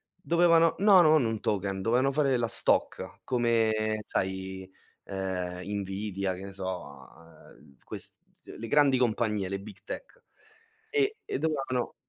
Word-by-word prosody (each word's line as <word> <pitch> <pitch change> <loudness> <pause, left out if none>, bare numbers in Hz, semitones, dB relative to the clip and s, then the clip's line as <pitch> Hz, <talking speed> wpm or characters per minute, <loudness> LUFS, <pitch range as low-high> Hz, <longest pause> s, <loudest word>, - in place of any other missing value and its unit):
dovevano 170 -2 +4
no, 200 -3 +7
non 155 -4 +5
un 110 -1 -1
token, 100 -2 -1
dovevano 125 +6 +2
fare 135 -2 +2
la 115 -1 0
stock - - 0
come 110 -3 +1
sai, 95 0 -3 0.4
ehm, 90 -2 -4 0.2
Nvidia, 95 -1 -3
che 95 - -9
ne 100 - -9
so, 95 -1 -6
uhm, 85 -2 -14
ehm, 70 -2 -21
ques - - -3 0.3
le 115 - -8
grandi 140 -1 +4
compagnie, 110 -5 0
le 100 0 -3
big 100 -1 -11
tech. - - -8 0.7
E 430 0 +1
e - - -2
dovevano 135 -5 -1
110 Hz, 140 wpm, -28 LUFS, 95-140 Hz, 0.7 s, no